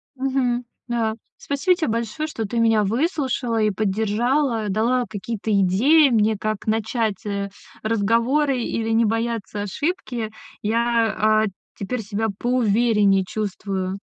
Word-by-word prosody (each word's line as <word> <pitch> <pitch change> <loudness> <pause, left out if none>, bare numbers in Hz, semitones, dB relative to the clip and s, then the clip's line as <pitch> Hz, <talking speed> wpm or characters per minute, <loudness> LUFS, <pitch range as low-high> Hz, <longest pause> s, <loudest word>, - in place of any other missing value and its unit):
Мгм. 260 -2 0 0.2
Да. 230 -2 0 0.2
Спасибо 285 +6 +1
тебе 340 -3 -1
большое, 230 +7 -2
что 225 -8 -4
ты 235 +3 -2
меня 225 -2 +4
выслушала 250 - 0
и 215 - +3
поддержала, 220 +4 0
дала 235 +5 +1
какие-то 215 +2 -4
идеи 215 - +5
мне, 220 -2 +3
как 215 0 -3
начать, 220 -1 -1
э, 200 -1 -2 0.3
разговоры 235 +6 +2
или 225 -1 -2
не 225 +1 +3
бояться 225 -2 -2
ошибки. 245 - -3 0.3
Я, 230 0 +1 0.3
а, - - +2 0.3
теперь 225 +5 -3
себя 215 +1 -2
поувереннее 220 -5 +3
чувствую. 195 -2 -3
225 Hz, 125 wpm, -22 LUFS, 210-245 Hz, 0.3 s, идеи